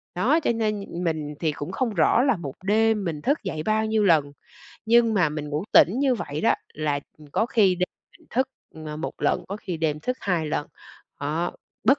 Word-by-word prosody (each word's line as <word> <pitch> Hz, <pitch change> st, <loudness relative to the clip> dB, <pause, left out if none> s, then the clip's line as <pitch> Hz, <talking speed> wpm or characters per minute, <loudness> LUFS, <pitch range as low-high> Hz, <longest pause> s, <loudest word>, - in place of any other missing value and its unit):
Đó, 255 Hz, -, +3 dB
cho 300 Hz, -, +1 dB
nên, 210 Hz, -6 st, -2 dB
mình 155 Hz, -3 st, -2 dB
thì 160 Hz, -2 st, +1 dB
cũng 145 Hz, +3 st, -6 dB
không 230 Hz, +2 st, -1 dB
rõ 215 Hz, +7 st, +4 dB
là 270 Hz, -3 st, +3 dB
1 140 Hz, -6 st, -6 dB
đêm 215 Hz, +1 st, +2 dB
mình 160 Hz, -5 st, -3 dB
thức 280 Hz, -, 0 dB
dậy 160 Hz, -5 st, -3 dB
bao 215 Hz, +4 st, +1 dB
nhiêu 220 Hz, -1 st, +1 dB
lần, 155 Hz, -7 st, +4 dB, 0.6 s
nhưng 230 Hz, 0 st, +5 dB
mà 180 Hz, -6 st, +3 dB
mình 150 Hz, 0 st, -5 dB
ngủ 150 Hz, +4 st, -2 dB
tỉnh 200 Hz, +9 st, +6 dB
như 270 Hz, -2 st, +3 dB
vậy 150 Hz, -9 st, -4 dB
đó, -, -, +4 dB, 0.2 s
là, 150 Hz, -2 st, -1 dB, 0.2 s
ừm, 150 Hz, -, -14 dB
có 220 Hz, -, +2 dB
khi 200 Hz, -6 st, +4 dB
đêm 180 Hz, 0 st, -1 dB, 0.3 s
mình -, -, -24 dB
thức, 260 Hz, +2 st, +1 dB, 0.4 s
ờ, 150 Hz, 0 st, -5 dB
1 155 Hz, -, -4 dB
lần, -, -, +1 dB
có 200 Hz, -, -3 dB
khi 185 Hz, -5 st, -5 dB
đêm 155 Hz, -2 st, -1 dB
thức 250 Hz, +9 st, -2 dB
2 175 Hz, -5 st, 0 dB
lần, 150 Hz, 0 st, -2 dB, 0.5 s
đó, 155 Hz, +5 st, -1 dB, 0.3 s
bất 275 Hz, +2 st, +5 dB
180 Hz, 215 wpm, -25 LUFS, 155-220 Hz, 0.6 s, tỉnh